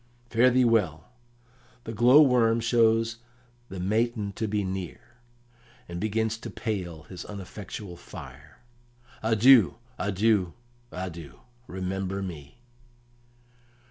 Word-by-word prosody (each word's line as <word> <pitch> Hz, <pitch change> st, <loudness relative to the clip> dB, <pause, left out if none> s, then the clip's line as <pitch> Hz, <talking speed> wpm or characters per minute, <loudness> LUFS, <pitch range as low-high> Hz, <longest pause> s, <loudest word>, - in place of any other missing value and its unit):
"Fare 120 Hz, +2 st, +5 dB
thee 125 Hz, 0 st, +3 dB
well! 105 Hz, -7 st, +1 dB, 0.7 s
The 115 Hz, -, -6 dB
glow 125 Hz, +7 st, +7 dB
worm 115 Hz, -4 st, +3 dB
shows 115 Hz, -1 st, +2 dB, 0.5 s
the 95 Hz, -, -7 dB
matin 105 Hz, +2 st, 0 dB
to 110 Hz, -, -3 dB
be 105 Hz, 0 st, -1 dB
near, 95 Hz, -2 st, -5 dB, 0.9 s
and 85 Hz, 0 st, -6 dB
begins 110 Hz, +1 st, -1 dB
to -, -, -7 dB
pale 90 Hz, -8 st, -4 dB
his 90 Hz, +1 st, -9 dB
uneffectual 100 Hz, -2 st, -8 dB
fire. 75 Hz, -, -12 dB, 0.6 s
Adieu, 110 Hz, 0 st, +5 dB, 0.2 s
adieu, 100 Hz, -2 st, +1 dB, 0.4 s
adieu! 85 Hz, -5 st, -7 dB, 0.3 s
Remember 95 Hz, +1 st, -3 dB
me." 80 Hz, -, -8 dB
105 Hz, 105 wpm, -27 LUFS, 90-115 Hz, 0.9 s, glow